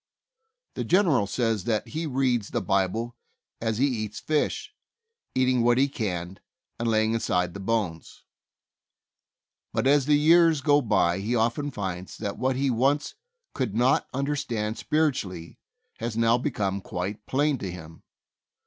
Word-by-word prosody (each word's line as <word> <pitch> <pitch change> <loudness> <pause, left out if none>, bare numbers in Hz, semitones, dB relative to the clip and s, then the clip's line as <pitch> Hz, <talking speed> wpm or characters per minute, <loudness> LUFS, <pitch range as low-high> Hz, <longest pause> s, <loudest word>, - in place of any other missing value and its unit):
The - - -3
General 165 - +3
says 115 -2 -1
that 110 -3 -1
he 160 +1 -3
reads 125 -6 0
the - - -1
Bible 105 +5 0 0.5
as 110 -2 -1
he 135 - +3
eats 110 -6 -3
fish, 155 - -1 0.6
eating 130 -1 +3
what 120 +1 +3
he 135 +2 +4
can, 95 -8 -4 0.4
and 115 0 0
laying 110 0 +2
aside 90 -6 0
the 100 - -7
bones; 95 -6 -3 1.5
but - - -1
as 140 0 +4
the 150 -1 +5
years 165 0 +5
go 145 0 +4
by 95 -6 +2
he 110 +5 -1
often 120 +5 0
finds 95 -7 -5
that 100 0 -4
what 130 +1 +1
he 135 0 +1
once 140 +5 +1 0.4
could 110 -6 -2
not 125 +3 +3
understand 130 -6 -2
spiritually 105 - -1 0.4
has 115 -1 -3
now 115 0 +4
become 105 -7 -1
quite 95 +4 -5
plain 145 0 +1
to 95 - -4
him. 80 -2 -11
115 Hz, 145 wpm, -26 LUFS, 100-140 Hz, 1.5 s, the